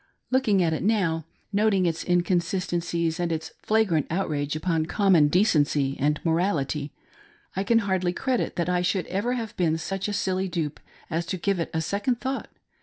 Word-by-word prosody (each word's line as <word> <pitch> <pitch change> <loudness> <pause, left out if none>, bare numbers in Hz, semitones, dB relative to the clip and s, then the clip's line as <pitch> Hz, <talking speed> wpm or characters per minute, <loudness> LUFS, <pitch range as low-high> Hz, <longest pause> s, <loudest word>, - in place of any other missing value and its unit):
Looking 220 -8 +3
at 160 -1 +1
it 155 - -2
now; 185 -7 +1 0.3
noting 200 -2 +3
its 165 -1 -1
inconsistencies 175 -1 0
and 175 -1 0
its 160 0 -3
flagrant 210 -9 +2
outrage 155 -5 -1
upon 160 0 0
common 185 -6 +4
decency 145 -6 +2
and 150 +2 +1
morality, 160 -4 0 0.6
I 190 - 0
can 230 +3 +3
hardly 185 -2 +1
credit 255 +6 -1
that 170 -1 -1
I 180 0 +1
should 180 +1 0
ever 205 +7 -1
have 230 -4 -4
been 160 -3 +2
such 195 +4 -3
a 205 - -2
silly 190 -1 0
dupe 165 -5 -3 0.3
as 170 +2 -1
to 185 - -2
give 195 +1 0
it 165 - -2
a 160 - -1
second 205 - -1
thought. 265 +1 -3
175 Hz, 175 wpm, -26 LUFS, 160-200 Hz, 0.6 s, common